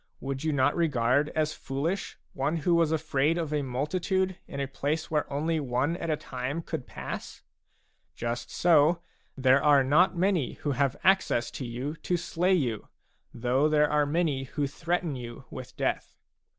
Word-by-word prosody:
Would 135 Hz, +1 st, -4 dB
you 160 Hz, -, +1 dB
not 140 Hz, 0 st, +2 dB
regard 140 Hz, -3 st, +2 dB
as 155 Hz, -1 st, +1 dB
foolish 155 Hz, +8 st, -3 dB, 0.2 s
one 145 Hz, +5 st, 0 dB
who 175 Hz, -, +4 dB
was 165 Hz, -2 st, +3 dB
afraid 155 Hz, 0 st, +1 dB
of 160 Hz, -3 st, -2 dB
a 150 Hz, -, +1 dB
multitude 180 Hz, +8 st, -1 dB
in 140 Hz, -, -6 dB
a 140 Hz, -, -1 dB
place 150 Hz, +4 st, -2 dB
where 150 Hz, -2 st, 0 dB
only 155 Hz, +3 st, 0 dB
one 135 Hz, +3 st, 0 dB
at 165 Hz, -1 st, -4 dB
a 155 Hz, -, +1 dB
time 130 Hz, +6 st, -4 dB
could 160 Hz, -6 st, -5 dB
pass? -, -, -7 dB, 0.7 s
Just 120 Hz, 0 st, -3 dB
so, 170 Hz, 0 st, +4 dB, 0.3 s
there 130 Hz, +1 st, +4 dB
are 145 Hz, -2 st, +6 dB
not 170 Hz, +7 st, +4 dB
many 180 Hz, -6 st, +1 dB
who 145 Hz, -, -3 dB
have 140 Hz, -1 st, +1 dB
access 190 Hz, -11 st, +3 dB
to 130 Hz, -, -5 dB
you 125 Hz, +6 st, -4 dB
to 180 Hz, -, -1 dB
slay 180 Hz, +2 st, +1 dB
you, 120 Hz, -, -1 dB, 0.4 s
though 130 Hz, +5 st, +1 dB
there 150 Hz, -1 st, +3 dB
are 150 Hz, -1 st, +3 dB
many 145 Hz, -4 st, 0 dB
who 145 Hz, +3 st, -2 dB
threaten 165 Hz, +2 st, -2 dB
you 120 Hz, -2 st, -8 dB
with -, -, -9 dB
death. -, -, -2 dB
150 Hz, 170 wpm, -28 LUFS, 135-165 Hz, 0.7 s, are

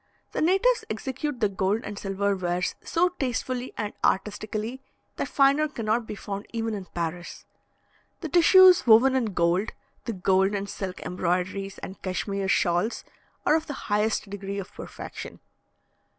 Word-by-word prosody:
The -, -, -2 dB
natives 390 Hz, +9 st, +3 dB
execute 260 Hz, +4 st, -4 dB
the 210 Hz, -, +4 dB
gold 195 Hz, +2 st, 0 dB
and 205 Hz, -, -6 dB
silver 200 Hz, 0 st, 0 dB
wares 180 Hz, -1 st, -1 dB
so 355 Hz, +2 st, +2 dB
tastefully 255 Hz, -1 st, -2 dB
and 210 Hz, -1 st, -3 dB
artistically, 215 Hz, +5 st, -1 dB, 0.4 s
that -, -, -2 dB
finer 280 Hz, +2 st, +3 dB
cannot 230 Hz, -4 st, -1 dB
be -, -, -5 dB
found 200 Hz, 0 st, -6 dB
even 225 Hz, -1 st, -2 dB
in 200 Hz, -3 st, -5 dB
Paris. 170 Hz, 0 st, -5 dB, 0.8 s
The 320 Hz, -, -4 dB
tissues 360 Hz, -1 st, +7 dB
woven 240 Hz, +4 st, +7 dB
in 260 Hz, -3 st, +2 dB
gold, 175 Hz, +4 st, +1 dB, 0.3 s
the 230 Hz, -, -2 dB
gold 190 Hz, +1 st, +2 dB
and 200 Hz, 0 st, -3 dB
silk 190 Hz, -2 st, -5 dB
embroideries 185 Hz, +2 st, -2 dB
and 190 Hz, -, -8 dB
Cashmere 195 Hz, +1 st, -2 dB
shawls, 180 Hz, +3 st, +1 dB, 0.4 s
are -, -, +4 dB
of 320 Hz, 0 st, +1 dB
the 290 Hz, -, -4 dB, 0.2 s
highest 215 Hz, +1 st, +1 dB
degree 200 Hz, 0 st, -5 dB
of 195 Hz, -2 st, -6 dB
perfection. -, -, -8 dB
210 Hz, 150 wpm, -26 LUFS, 190-255 Hz, 0.8 s, tissues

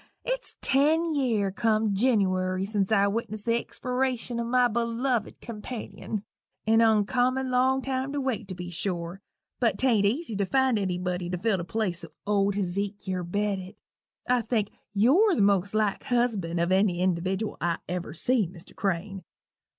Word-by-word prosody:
it's -, -, -3 dB
ten 315 Hz, +4 st, +3 dB
year 230 Hz, -9 st, +1 dB
come 215 Hz, 0 st, +1 dB
Jinniwary 190 Hz, -4 st, +1 dB
sence 205 Hz, -1 st, -1 dB
I 200 Hz, -2 st, +5 dB
witnessed 215 Hz, 0 st, -3 dB
the 230 Hz, -, +2 dB
expiration 250 Hz, -1 st, -2 dB
o' -, -, 0 dB
my 250 Hz, +1 st, +3 dB
belovid 235 Hz, +1 st, -1 dB
companion 220 Hz, -2 st, -6 dB, 0.4 s
an 225 Hz, +1 st, +4 dB
oncommon 245 Hz, +4 st, +2 dB
long 260 Hz, +1 st, +2 dB
time 265 Hz, 0 st, -2 dB
to 290 Hz, -, -1 dB
wait, 240 Hz, -6 st, -2 dB
to 185 Hz, -, -6 dB
be 180 Hz, 0 st, -6 dB
sure 175 Hz, +1 st, -3 dB, 0.4 s
but 225 Hz, -6 st, +2 dB
'tain't 225 Hz, -6 st, +3 dB
easy 240 Hz, +1 st, -2 dB
to 200 Hz, -, +1 dB
find 265 Hz, -3 st, +2 dB
anybody 180 Hz, -2 st, -2 dB
to 180 Hz, -, -2 dB
fill 205 Hz, +2 st, +1 dB
the 170 Hz, -, -3 dB
place 185 Hz, -3 st, -2 dB, 0.2 s
o' 200 Hz, -1 st, +2 dB
Hezekier 195 Hz, -1 st, -2 dB
Bedott. 195 Hz, +1 st, -2 dB, 0.5 s
I 250 Hz, -1 st, +3 dB
think 225 Hz, -3 st, -1 dB, 0.2 s
you're 295 Hz, -, +4 dB
the -, -, +1 dB
most 200 Hz, 0 st, +2 dB
like 215 Hz, -2 st, +1 dB
husband 215 Hz, -9 st, 0 dB
of 170 Hz, +2 st, +1 dB
ary 190 Hz, -1 st, +3 dB
individdiwal 185 Hz, +3 st, -1 dB
I 170 Hz, -1 st, +1 dB
ever 175 Hz, -3 st, -4 dB
see, 235 Hz, +2 st, +2 dB
Mr. 175 Hz, 0 st, -13 dB
Crane. 195 Hz, 0 st, -2 dB
210 Hz, 155 wpm, -27 LUFS, 190-245 Hz, 0.5 s, I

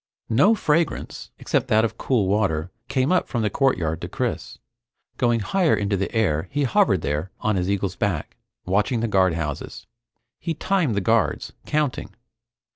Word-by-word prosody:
No 185 Hz, -, +5 dB
fragrance, 165 Hz, -4 st, -1 dB
except -, -, -1 dB
that 110 Hz, +1 st, +4 dB
of 110 Hz, 0 st, -3 dB
cool 115 Hz, -8 st, +1 dB
water, 95 Hz, -5 st, 0 dB, 0.2 s
came 130 Hz, +3 st, +1 dB
up 185 Hz, -, +2 dB
from 120 Hz, -4 st, -2 dB
the 105 Hz, -, 0 dB
courtyard 90 Hz, -, 0 dB
to -, -, -4 dB
Chris. -, -, -3 dB, 0.6 s
Going 120 Hz, -2 st, +2 dB
higher 175 Hz, -, +2 dB
into 100 Hz, 0 st, 0 dB
the 95 Hz, 0 st, -2 dB
air 95 Hz, -8 st, 0 dB
he 145 Hz, +1 st, -1 dB
hovered 105 Hz, -, +3 dB
there 75 Hz, +5 st, -2 dB
on 110 Hz, -1 st, 0 dB
his 90 Hz, 0 st, -1 dB
eagle's 100 Hz, -2 st, -1 dB
back, 90 Hz, -7 st, -2 dB, 0.3 s
watching 105 Hz, +6 st, +1 dB
the 115 Hz, -, 0 dB
guardhouses. 85 Hz, -7 st, -1 dB, 0.5 s
He 165 Hz, -1 st, -3 dB
timed 180 Hz, -, 0 dB
the 100 Hz, -, +1 dB
guards, 115 Hz, +1 st, +1 dB
counting. 150 Hz, -4 st, -1 dB
110 Hz, 160 wpm, -23 LUFS, 95-135 Hz, 0.6 s, No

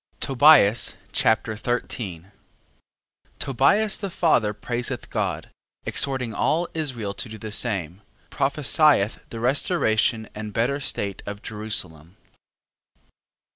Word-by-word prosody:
Tobias 130 Hz, -5 st, +5 dB, 0.2 s
Chapter 110 Hz, 0 st, +1 dB
13 105 Hz, -, -4 dB, 1.1 s
Tobias 190 Hz, -, +2 dB
the 200 Hz, -, -4 dB
father 155 Hz, -, +2 dB
praiseth 120 Hz, +3 st, -3 dB
God, -, -, -2 dB, 0.3 s
exhorting 130 Hz, -4 st, 0 dB
all 170 Hz, +3 st, +1 dB
Israel 125 Hz, -11 st, -3 dB
to 110 Hz, -, -5 dB
do 110 Hz, -, -8 dB
the 110 Hz, 0 st, -7 dB
same. 95 Hz, -5 st, -3 dB, 0.3 s
Prophesieth 140 Hz, -5 st, +2 dB
the 115 Hz, -, -7 dB
restoration 115 Hz, -, +1 dB
and 105 Hz, -1 st, -7 dB
better 125 Hz, +6 st, 0 dB
state 100 Hz, -8 st, -3 dB
of 100 Hz, 0 st, -6 dB
Jerusalem. 95 Hz, -6 st, -4 dB
115 Hz, 100 wpm, -24 LUFS, 105-140 Hz, 1.1 s, Tobias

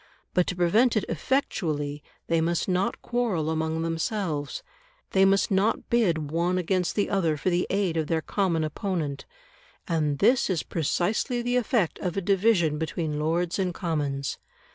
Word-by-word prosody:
But 180 Hz, -1 st, +2 dB
to 180 Hz, -, -2 dB
prevent 215 Hz, +8 st, +3 dB
it 210 Hz, -, 0 dB
effectually, 155 Hz, -, -1 dB, 0.2 s
they 165 Hz, -1 st, +1 dB
must 170 Hz, +1 st, 0 dB
not 185 Hz, 0 st, 0 dB
quarrel 210 Hz, -11 st, 0 dB
among 160 Hz, 0 st, -1 dB
themselves; 165 Hz, -3 st, -2 dB, 0.5 s
they 190 Hz, 0 st, +5 dB
must 195 Hz, +1 st, +3 dB
not 195 Hz, +3 st, +1 dB
bid 170 Hz, -11 st, +1 dB
one 170 Hz, +3 st, +1 dB
against 180 Hz, 0 st, 0 dB
the 205 Hz, -, +1 dB
other 170 Hz, -6 st, +1 dB
for 180 Hz, +6 st, 0 dB
the 175 Hz, +1 st, +1 dB
aid 190 Hz, -4 st, 0 dB
of 155 Hz, -2 st, 0 dB
their 160 Hz, 0 st, 0 dB
common 180 Hz, -6 st, 0 dB
opponent. 155 Hz, -3 st, -3 dB, 0.6 s
And 155 Hz, -4 st, 0 dB
this 240 Hz, -, +3 dB
is 175 Hz, -5 st, 0 dB
precisely 210 Hz, -, -1 dB
the 245 Hz, +1 st, 0 dB
effect 235 Hz, -, +1 dB
of 180 Hz, 0 st, -3 dB
a -, -, +1 dB
division 185 Hz, -5 st, +2 dB
between 160 Hz, -2 st, -2 dB
Lords 165 Hz, +4 st, 0 dB
and 180 Hz, -3 st, -1 dB
Commons. 145 Hz, -5 st, -2 dB
175 Hz, 160 wpm, -26 LUFS, 160-195 Hz, 0.6 s, they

